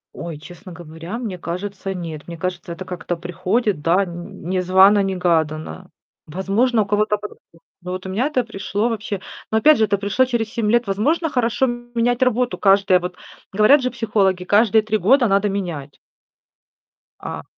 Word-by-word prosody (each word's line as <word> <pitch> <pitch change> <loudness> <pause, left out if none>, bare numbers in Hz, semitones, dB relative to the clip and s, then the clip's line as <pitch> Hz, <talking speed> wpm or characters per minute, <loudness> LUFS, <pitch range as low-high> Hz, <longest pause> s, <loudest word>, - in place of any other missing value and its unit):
Ой, 170 -3 -6
честно 175 +5 -12
говоря, 170 +4 -8
мне 215 -7 -5
кажется, 195 +3 -5
нет. 165 -4 -7
Мне 170 -1 -7
кажется, 180 0 -4
это 185 +3 -8
как-то 180 -1 -4
приходит, 185 +2 -1
да, 180 +5 +2
не 175 +1 -6
незвано-негаданно. 180 - +2 0.4
Возможно, 205 +8 +1
у - - -9
кого-то 210 +1 +1
по-другому, 205 -5 -12 0.2
но 180 +1 -6
вот 185 +1 -5
у - - -5
меня 220 +9 0
это 265 -5 0
пришло 205 0 -2
вообще 210 -3 -4 0.3
но, 220 - +2
опять 300 +7 +6
же, 220 - +3
это 205 -1 0
пришло 205 +6 +1
через 235 -4 -2
7 225 -3 -1
лет. 240 +1 +3
Возможно, 290 - 0
хорошо 245 -2 +1
менять 240 0 -1
работу 250 -1 +1
каждое 195 -2 +4
вот 180 0 -6 0.4
говорят 215 +9 +5
же 255 - 0
психологи: 205 -6 0
каждые 215 +2 +4
3 215 0 0
года 240 +6 +4
надо 200 +1 +2
менять. 170 -8 -5 1.2
А - - -6
200 Hz, 165 wpm, -20 LUFS, 180-225 Hz, 1.2 s, опять